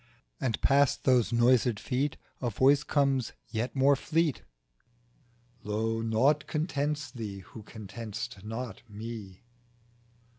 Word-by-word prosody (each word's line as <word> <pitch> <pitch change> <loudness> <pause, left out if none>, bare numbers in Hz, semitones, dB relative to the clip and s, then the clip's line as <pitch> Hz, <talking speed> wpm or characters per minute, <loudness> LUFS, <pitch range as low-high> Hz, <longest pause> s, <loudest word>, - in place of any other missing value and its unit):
nd 115 -4 0
past 140 0 +3
those 125 -3 +3
noised 120 -1 +4
Feet 135 +3 -1 0.2
A 125 - 0
voice 135 +6 +4
comes 135 -5 +1 0.2
yet 115 +4 -2
more 140 +1 +5
fleet 160 +1 0
M - - -25 1.2
Lo 110 +2 -1
I - - -3
naught 130 +7 +2
contents 150 -3 -1
thee, 105 -5 -6
who 110 - -11
content'st 110 0 -7
not 115 -1 -5
Me." 105 -3 -8
120 Hz, 120 wpm, -29 LUFS, 110-140 Hz, 1.2 s, more